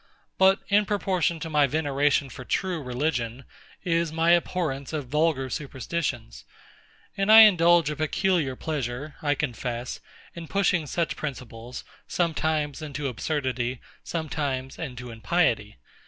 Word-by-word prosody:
But 190 +1 +5
in 205 0 +3
proportion 185 -5 0
to 165 - -4
my 150 -2 +4
veneration 145 -1 +1
for 130 - -8
true 180 +4 -1
religion, 125 -2 -2 0.4
is 170 -2 +1
my 165 +1 +2
abhorrence 160 -6 -2
of 145 -5 -4
vulgar 150 -2 +1
superstitions; 130 - -4 0.7
and 195 +2 +2
I 220 0 +11
indulge 175 -6 +6
a - - -3
peculiar 155 -2 0
pleasure, 145 0 -4
I 145 -1 +1
confess, 125 -3 -3 0.3
in 170 -1 -8
pushing 185 -5 +1
such 170 +3 -1
principles, 125 -4 -7 0.2
sometimes 155 -3 -1
into 145 -1 -4
absurdity, 130 -2 -2 0.2
sometimes 140 -5 -3
into 125 -5 -6
impiety. 110 -3 0
150 Hz, 125 wpm, -26 LUFS, 130-170 Hz, 0.7 s, I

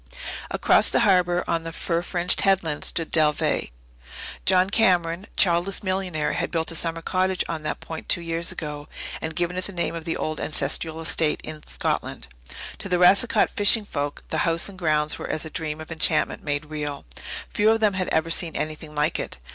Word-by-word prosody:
Across - - +4
the - - +2
harbour, 180 -4 +3
on 165 -1 -1
a - - -4
fir 170 +1 -1
fringed 175 0 0
headland, 180 -6 +1
stood 165 -1 -1
Dalveigh. 155 -2 +2 0.8
John 185 0 +4
Cameron, 180 -4 +2
childless 180 +2 +2
millionaire, 185 -6 -1
had - - -1
built 165 0 -1
a - - -4
summer 165 0 -2
cottage 185 +1 +1
on 160 -2 -4
that 150 0 -4
point 160 -1 -8
two - - +4
years 165 0 +1
ago, 150 -2 -5 0.3
and 160 0 -4
given 175 +1 -1
it 185 - +3
the - - 0
name 170 -2 -1
of 165 -1 -6
the 165 - -2
old 155 0 -3
ancestral 160 +2 -1
estate 160 -1 +1
in 155 -1 -7
Scotland. - - -2 0.5
To 195 - -7
the 180 - +2
Racicot 200 +5 +4
fishing 205 +1 +4
folk 145 -6 -4
the - - 0
house 165 0 +1
and 195 -2 -9
grounds 155 -3 +1
were - - -6
as 155 - -2
a 160 - -8
dream 155 -2 -4
of 155 +1 -9
enchantment 165 - +1
made 145 0 -2
real. 150 -2 -5 0.5
Few 210 +1 +3
of 225 0 +3
them 210 -2 +3
had 185 -1 -1
ever 160 +1 0
seen 165 -1 +1
anything 155 0 -5
like 150 +1 +1
it. - - -4
165 Hz, 195 wpm, -24 LUFS, 155-185 Hz, 0.8 s, Across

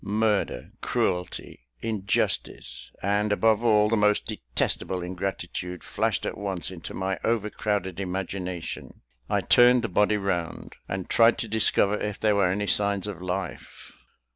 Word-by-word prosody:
Murder, 105 0 0
cruelty, 90 -8 -2
injustice, 105 - -1
and, 100 +2 +1
above 110 +1 +3
all, 105 -2 +5
the 115 - +2
most 105 -1 +3
detestable 90 - -1
ingratitude, 90 -1 -4
flashed - - -1
at - - -3
once 95 -3 -2
into 85 -3 -8
my 95 0 -2
overcrowded 105 -4 -1
imagination. 90 -2 -4 0.3
I - - +2
turned 125 0 +6
the - - 0
body 105 +2 +2
round, 90 -4 -3 0.2
and 95 -1 -3
tried 115 0 +5
to 115 - -3
discover 105 -1 +2
if 105 -1 -3
there 110 -1 +3
were 100 -3 +3
any 100 +3 0
signs 100 -1 +1
of 100 -4 -6
life. 90 +1 -5
100 Hz, 140 wpm, -26 LUFS, 90-105 Hz, 0.3 s, turned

